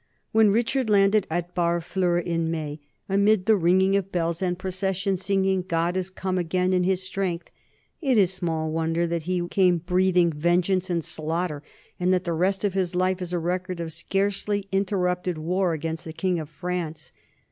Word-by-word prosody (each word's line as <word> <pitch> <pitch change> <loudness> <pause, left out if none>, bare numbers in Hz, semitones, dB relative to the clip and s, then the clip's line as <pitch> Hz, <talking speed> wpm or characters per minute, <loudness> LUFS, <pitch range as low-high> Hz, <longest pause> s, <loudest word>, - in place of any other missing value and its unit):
When 220 -1 +5
Richard 235 +3 +1
landed 200 0 +4
at 175 +2 -3
Barfleur 175 +1 0
in 165 -1 -1
May, 155 -2 -4 0.3
amid 200 0 +3
the 220 0 +5
ringing 190 +2 +3
of 195 -1 -1
bells 170 -1 -1
and 180 -1 0
processions 190 0 -2
singing 190 -1 +1
"God 170 0 -1
has 185 0 -2
come 185 -1 -2
again 180 +2 0
in 180 -1 +2
his 185 0 +1
strength," 185 -2 -3 0.5
it 265 -6 +2
is 190 -3 +4
small 160 -4 -2
wonder 165 +1 0
that 170 0 -2
he 175 -1 0
came 180 -1 +3
breathing 180 0 +2
vengeance 180 +4 +1
and 170 -2 0
slaughter, 160 -1 -2 0.4
and 180 +1 +2
that 185 -1 +2
the 170 - -2
rest 190 +5 0
of 200 -3 +1
his 185 -2 -1
life 185 +1 +1
is 180 -1 -4
a 180 - 0
record 180 +1 -2
of 165 -1 -4
scarcely 200 +2 -1
interrupted 180 -3 0
war 180 +3 0
against 160 +1 -4
the 160 - -7
king 180 0 0
of 155 -2 -6
France. 170 -1 -5
180 Hz, 180 wpm, -25 LUFS, 170-190 Hz, 0.5 s, When